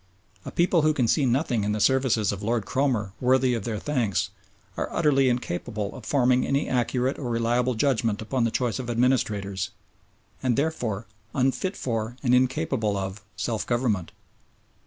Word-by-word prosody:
A - - -5
people 175 -1 +3
who 155 0 +2
can 125 -5 +2
see 140 +2 +3
nothing 125 -3 +1
in 105 +1 0
the 105 - -2
services 125 -3 +3
of 100 -1 -5
Lord 115 0 0
Cromer 125 -8 0
worthy 130 0 +3
of 115 -4 -3
their 115 -2 -2
thanks 120 -7 -1 0.4
are - - -3
utterly 135 -5 +3
incapable 110 -3 -3
of 125 -4 -10
forming 125 -2 +3
any 140 +1 0
accurate 125 +1 0
or 130 -4 -3
reliable 120 +2 +1
judgment 115 -4 +1
upon 120 +3 -1
the 115 - +2
choice 120 +1 -1
of 125 -2 -5
administrators, 110 -5 0 0.7
and 125 -3 +1
therefore 120 -9 -1 0.3
unfit 135 +9 0
for 115 0 -3
and 125 -2 +3
incapable 130 -5 +1
of 95 +1 -4
self 115 -3 -2
government. 120 -7 0
125 Hz, 160 wpm, -26 LUFS, 110-130 Hz, 0.7 s, people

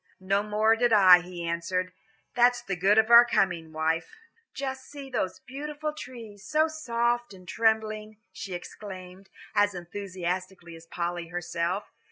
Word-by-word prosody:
"No 195 +2 +1
more 210 +2 +2
did 240 +1 +2
I," 190 -4 +8
he 175 -1 -7
answered. 180 +2 -2 0.4
"That's 245 0 +3
the 195 - -3
good 195 +4 +3
of 220 +1 +4
our 235 0 +11
coming, 180 -8 0
wife." 160 - -1 0.4
"Just 265 -1 -5
see 280 -2 -9
those 190 -7 -2
beautiful 295 +4 -5
green - - -18
trees, 230 -8 -10
so 310 +1 +2
soft 240 -7 -1
and 185 -1 -16
trembling," 215 -1 0 0.2
she 190 -2 -6
exclaimed, 185 0 -10 0.2
as 205 -1 +2
enthusiastically 180 -1 -5
as 165 0 -14
Polly 175 0 -3
herself. 175 +2 -3
200 Hz, 150 wpm, -27 LUFS, 180-235 Hz, 0.4 s, our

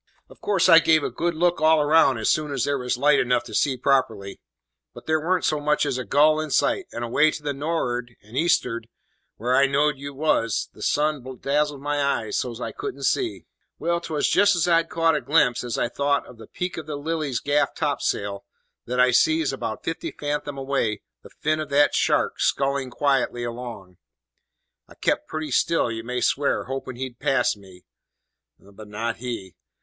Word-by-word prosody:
"Of - - -17
course 195 -4 +2
I 165 -2 +9
gave 160 -2 +3
a - - -2
good 170 0 -2
look 175 +1 +1
all 155 -1 +4
round 150 -4 +4
as 110 - -2
soon 150 -1 +1
as 135 -4 -1
there 140 -1 0
was 125 -1 -2
light 145 +3 +4
enough 125 -1 +1
to 120 - -11
see 135 -3 +1
properly; 115 -7 0 0.5
but - - -12
there 155 0 +1
warn't 180 +3 0
so 155 - +1
much 150 0 +1
as 130 - -1
a - - -3
gull 150 +7 +3
in 155 0 -3
sight, 370 - +1
and 120 - -5
away 145 +6 +3
to 150 - -6
the 145 -1 -2
nor'ard, 125 -5 -3
and 110 +4 -14
east'ard 125 -7 +1 0.5
where 125 +3 0
I 140 +1 +5
knowed 140 0 +1
you 140 0 -7
was, 130 -6 0
the - - -15
sun 150 -2 0 0.2
dazzled 145 0 0
my 145 0 -1
eyes 115 -6 -1
so's 120 -2 -3
I - - -4
couldn't 415 -1 -6
see. 365 -4 -1 0.3
"Well, 170 0 -1
'twas 155 -3 -1
just 205 -1 +4
as 175 0 +1
I'd 165 -1 +3
caught 165 0 +2
a - - -1
glimpse, 140 -6 +2
as 120 -2 -3
I - - +1
thought, 140 +3 0
of 120 - -15
the 110 - -11
peak 180 0 -5
of 160 -2 -7
the 150 - -4
Lily's 145 -3 -2
gaff 145 +1 0
topsail, 100 -1 -2 0.4
that 125 +1 -2
I 125 0 +5
sees, 155 +3 +2
about 115 -4 -5
fifty 165 - -4
fathom 145 -1 -4
away, 135 -6 -1 0.2
the - - -14
fin 155 +1 -1
of 155 -1 -4
that 145 +1 +3
shark - - +1
scullin' 135 -1 0
quietly 130 -2 0
along. 115 -6 -7 0.9
I - - -17
kept - - -1
pretty 155 -2 -5
still, 165 -2 +2
you 115 0 -5
may 125 +1 -3
swear, 140 +1 +1
hoping 135 -1 -6
he'd 125 -1 -6
pass 135 -5 +1
me. 95 -3 -16 0.7
But 100 +2 -14
not 115 +2 -3
he. 115 -7 -6
140 Hz, 195 wpm, -24 LUFS, 120-155 Hz, 0.9 s, I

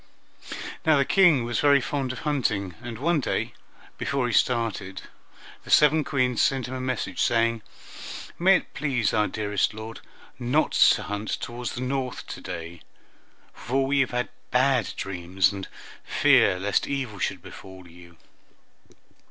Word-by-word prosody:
Now 155 -2 +4
the 140 - +3
King 175 -9 +4
was 120 -1 -2
very 145 -1 +5
fond 135 0 -2
of 130 - -7
hunting, 110 - -1
and 120 -2 -7
one 165 +5 +1
day, - - -2 0.5
before 135 -3 -1
he 120 - -2
started, 110 -6 0 0.6
the - - -14
seven 150 +1 +5
Queens 125 -4 0
sent 135 -3 +1
him 130 - -6
a 130 - -4
message 125 -8 -3
saying, 115 -1 +2 0.8
"May 190 +3 +6
it - - -11
please 130 -8 0
our 105 0 +2
dearest 105 -1 -1
lord 110 +1 -8 0.4
not 125 +6 +1
to - - +5
hunt 105 +1 -4
toward 120 +1 -6
the 120 - -4
north 130 0 -3
to - - -7
day, 85 0 -7 0.7
for 135 +4 -1
we 140 +1 +1
have 135 - +2
dreamed 125 0 -2 0.2
bad 125 -3 +2
dreams, 95 0 0
and 100 -1 -6 0.4
fear 90 - +4
lest 100 +1 0
evil 130 -8 -3
should - - -2
befall 95 -1 -12
you." 85 0 -16
120 Hz, 150 wpm, -25 LUFS, 100-135 Hz, 0.8 s, May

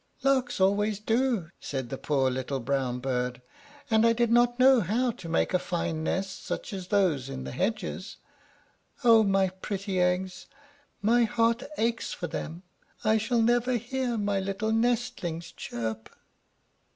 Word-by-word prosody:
"Larks 260 -4 +2
always 205 +2 +2
do," 225 -5 0
said 130 -4 -4
the 135 - -4
poor 135 -3 +1
little 130 +1 -3
brown 130 0 -1
bird; 125 -1 -2 0.5
"and 220 0 +5
I 230 0 +5
did 235 0 +1
not 240 0 +4
know 260 -1 +6
how 235 +7 +1
to 185 -7 -10
make 165 - +1
a 180 - +3
fine 165 -3 -2
nest 190 +4 -2
such - - -4
as 185 -2 -5
those 175 - +1
in 130 -1 -5
the - - -6
hedges. 195 - -3 0.9
Oh, 230 -2 +7
my 195 -2 +2
pretty 190 +1 -4
eggs! 180 +1 -1 0.6
my 235 +3 +4
heart 230 +2 +1 0.2
aches 230 0 -1
for 175 - -5
them! 170 +1 -5 0.4
I 220 -1 +3
shall 230 +1 +1
never 240 +2 +2
hear 245 +1 -1
my 205 -2 0
little 195 +3 -2
nestlings 225 -8 -1
chirp!" 110 -1 -5
200 Hz, 150 wpm, -28 LUFS, 165-230 Hz, 0.9 s, Oh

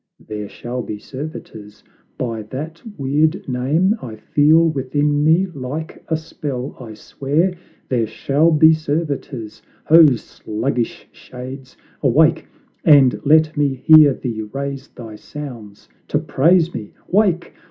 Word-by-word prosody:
There 105 -1 -7
shall 125 +1 -5
be 105 - -6
servitors, 110 -5 -9 0.3
by 115 -3 -3
that 155 +5 -6 0.2
weird 150 +5 0
name 145 - +1
I 115 -4 -7
feel 150 +8 +3
within 145 0 0
me 165 +5 +4
like 155 -1 -7
a 160 - 0
spell; 145 -5 -6
I 115 -4 -9
swear 150 - -1 0.3
There 120 -4 0
shall 140 +8 +1
be 160 0 +6
servitors; 145 -8 -4 0.2
ho, 165 0 +8
sluggish 115 +2 -4
shades 130 +1 -10 0.2
Awake, - - +3 0.4
and 140 -4 +5
let 155 +1 +4
me 145 -2 +1
hear 150 0 +6
thee 115 -4 -4
raise 135 +5 -5
thy 110 -3 -11
sounds 120 -9 -10 0.2
To - - 0
praise 170 +4 +2
me! 105 - -7
Wake! 185 -3 +1
140 Hz, 125 wpm, -19 LUFS, 125-155 Hz, 0.4 s, ho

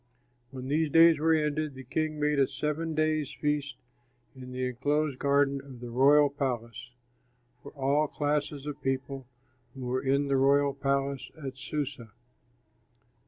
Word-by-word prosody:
When 130 -1 -7
these 155 +2 +1
days 165 0 +6
were 160 +1 +3
ended, 150 -1 -1
the 130 - -9
king 155 +4 -2
made 150 -1 +1
a 135 - +4
seven 155 +1 -3
days' 155 -2 0
feast 145 -3 -1 0.6
in 130 -1 -10
the 130 0 -2
enclosed 140 +3 -1
garden 140 -1 +2
of 135 -3 -12
the 120 0 -8
royal 140 +3 +5
palace, 125 -3 -4 0.7
for 140 - -11
all 145 +2 +1
classes 145 -1 -2
of 145 -1 -6
people 135 0 -3 0.5
who 135 - -9
were 125 +1 -1
in 140 +1 +1
the 135 -1 +2
royal 140 +1 +3
palace 140 -1 -1
at 135 -1 -5
Susa. 140 -3 -5
140 Hz, 150 wpm, -29 LUFS, 130-150 Hz, 0.7 s, days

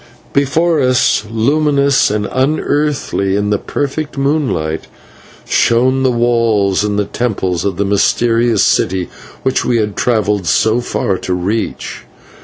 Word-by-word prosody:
Before 155 +3 +1
us, 125 -4 +2
luminous 140 +3 +2
and 105 0 -1
unearthly 140 -7 0
in 105 0 -1
the 105 - +1
perfect 145 +1 -4
moonlight, 130 - -1 0.6
shone 130 +3 +2
the 130 - +2
walls 115 -5 +1
and 105 -1 -2
temples 95 -7 -1
of 95 -3 -2
the 100 - 0
mysterious 115 +2 +2
city 95 -1 +1 0.3
which 130 0 0
we 120 - +1
had 105 -2 -1
travelled 105 -6 0
so 110 +8 +2
far 95 -5 -2
to 90 - -2
reach. 100 +5 -3
115 Hz, 125 wpm, -15 LUFS, 100-135 Hz, 0.6 s, us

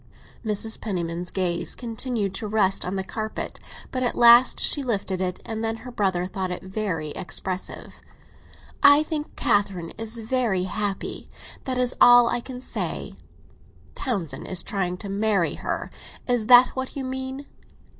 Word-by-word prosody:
Mrs. 220 0 -1
Penniman's 175 -4 -3
gaze 180 -3 -2
continued 230 -4 -3
to 210 +3 -4
rest 205 -2 +2
on 185 - -3
the 190 - -1
carpet; 215 +3 -5 0.3
but 255 - -2
at 245 - 0
last 240 +1 +7
she 290 - +1
lifted 200 -7 -2
it, 180 -1 -2
and 220 0 -4
then 225 0 -1
her 250 - -7
brother 190 -6 0
thought 185 0 -4
it 180 - -5
very 190 -5 -3
expressive. 185 +3 -5 0.8
"I 285 +1 +7
think 310 -1 -5
Catherine 195 -5 0
is 225 +1 +1
very 225 -5 0
happy; 200 +1 -3 0.4
that 260 -2 -2
is 250 -1 +2
all 245 -1 +8
I 240 - 0
can 250 +1 -8
say." - - -4 0.8
"Townsend 175 - -3
is 185 - +1
trying 180 -3 -2
to 200 - -7
marry 200 -2 +1
her—is 245 -4 -4
that 250 0 +8
what 260 0 -5
you 275 - -3
mean?" 265 +1 -5
215 Hz, 150 wpm, -24 LUFS, 190-245 Hz, 0.8 s, all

